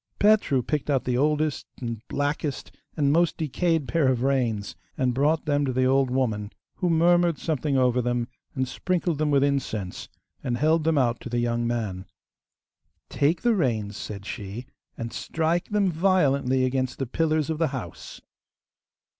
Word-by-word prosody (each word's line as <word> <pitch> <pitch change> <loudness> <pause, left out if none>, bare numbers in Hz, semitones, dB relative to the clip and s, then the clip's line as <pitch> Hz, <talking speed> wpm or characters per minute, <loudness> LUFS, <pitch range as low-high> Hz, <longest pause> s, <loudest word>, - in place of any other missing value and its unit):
Petru 205 - +3
picked 150 +1 -2
out 135 -3 +2
the 125 -1 -1
oldest, 150 +2 0
and 115 -3 -4
blackest, 145 0 -2 0.3
and 140 -2 +3
most 170 +1 +2
decayed 160 0 0
pair 165 -5 +2
of 130 -2 +1
reins, 120 -7 0 0.2
and 125 -1 +1
brought 150 +5 +1
them 145 -1 +1
to 135 - 0
the 130 +1 +1
old 135 0 +3
woman, 110 -5 -1 0.3
who 180 - 0
murmured 170 0 +3
something 150 -3 -1
over 125 -1 +3
them 120 -1 -1 0.3
and 130 -1 0
sprinkled 175 0 -1
them 155 -1 +1
with 140 -1 +3
incense, 115 -9 -2 0.3
and 120 -2 -1
held 155 +3 +2
them 160 -2 +2
out 120 -3 +2
to - - -7
the 120 - -1
young 120 0 0
man. 105 -6 -3 1.0
'Take 155 +4 +1
the 240 -1 +4
reins,' 110 - 0
said 100 -2 -7
she, 105 +2 -6 0.3
'and 115 0 -5
strike 165 +2 -1
them 205 -3 +2
violently 140 -7 +2
against 130 0 -1
the 135 - -2
pillars 155 +3 0
of 155 - -3
the 165 - +3
house. 130 - -7
135 Hz, 165 wpm, -25 LUFS, 120-160 Hz, 1.0 s, the